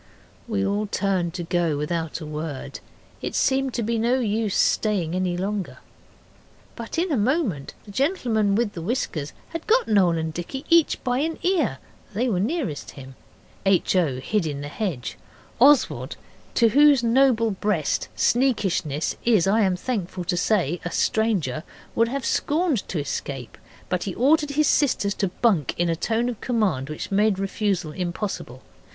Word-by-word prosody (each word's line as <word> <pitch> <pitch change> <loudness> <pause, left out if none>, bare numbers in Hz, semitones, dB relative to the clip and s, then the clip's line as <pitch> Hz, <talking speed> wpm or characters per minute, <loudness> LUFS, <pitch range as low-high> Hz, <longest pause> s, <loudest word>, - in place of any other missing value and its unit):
We 205 -4 0
all 205 +2 0
turned 185 -4 -1
to 175 - -3
go 170 -3 0
without 160 +2 -3
a - - -6
word, 150 -2 -5 0.4
it - - -4
seemed 270 -1 +1
to 235 - -1
be 230 +1 0
no 240 +3 +2
use 215 -3 0
staying 190 -7 +1
any 180 -1 -1
longer. 195 +1 -3 1.0
But 230 +5 -6
in 345 +1 0
a - - +2
moment 220 - 0
the 205 - -10
gentleman 230 - +1
with 225 -1 0
the 170 - -6
whiskers 165 - -2 0.2
had 330 -1 -6
got 475 +3 +3
Noel 185 -6 +3
and 160 0 -3
Dicky 265 - -6
each 335 -2 +4
by 250 0 0
an 320 +3 -1
ear 325 - +1 0.4
they 245 +5 +1
were 200 -7 0
nearest 230 - -2
him. 135 -1 -10 0.5
H. 195 -1 +2
O. 150 -8 +1
hid 185 +6 -1
in 145 -2 -4
the 145 - -5
hedge. 155 - -4 0.4
Oswald, 280 +3 +4 0.4
to 230 -2 +5
whose 285 +1 +5
noble 230 -2 +3
breast 190 -6 -1
sneakishness 190 - +1
is, 220 -7 +4
I 210 +4 +3
am 190 -3 +2
thankful 185 -4 -3
to 175 +1 -1
say, 175 -3 +1
a 175 - -3
stranger, 175 - 0 0.3
would 230 0 +3
have 275 +3 -3
scorned 305 - 0
to 180 - -3
escape, 135 -3 -5 0.3
but 180 -1 -1
he 190 - -4
ordered 295 +4 +3
his 305 +1 +3
sisters 245 -10 +2
to 200 - -1
bunk 185 - +1
in 175 0 +1
a 165 - +1
tone 230 +7 0
of 245 -4 -4
command 205 - 0
which 155 - -6
made 205 0 +3
refusal 195 -4 -1
impossible. 175 - -4
205 Hz, 165 wpm, -24 LUFS, 170-240 Hz, 1.0 s, to